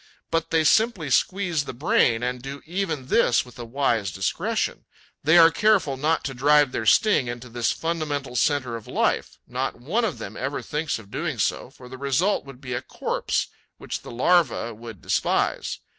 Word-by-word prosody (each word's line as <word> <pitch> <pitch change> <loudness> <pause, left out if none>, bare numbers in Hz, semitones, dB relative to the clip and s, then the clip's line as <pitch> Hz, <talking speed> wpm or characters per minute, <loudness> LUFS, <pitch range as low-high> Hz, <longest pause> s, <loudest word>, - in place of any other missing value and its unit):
But 165 0 0
they 160 -1 +2
simply 195 - +2
squeeze 175 -2 +1
the - - -7
brain 135 - +2
and 125 0 -2
do 135 +2 -8
even 165 -5 -3
this 125 -1 +3
with 125 -1 -15
a 120 - -5
wise 115 -5 0
discretion; 95 0 -2 0.4
they 160 +4 +5
are 165 -1 +8
careful 195 -7 +2
not 155 +4 0
to 135 - -3
drive 145 +1 +4
their 110 - -3
sting 205 - +4
into 120 +1 -6
this 120 0 0
fundamental 150 -6 -3
centre 130 -2 +1
of 115 - -9
life; - - 0
not - - -3
one 180 - -1
of 220 - -1
them 100 - -7
ever 135 +2 -3
thinks 150 +1 -2
of 105 -3 -14
doing - - -3
so, - - -1
for 125 - -14
the 130 +1 -10
result 140 +9 +1
would 135 -2 -12
be 130 -3 -6
a 120 - -2
corpse - - -2 0.3
which - - -5
the - - -11
larva 130 -2 +2
would 110 - -11
despise. - - 0
140 Hz, 185 wpm, -24 LUFS, 120-165 Hz, 0.4 s, are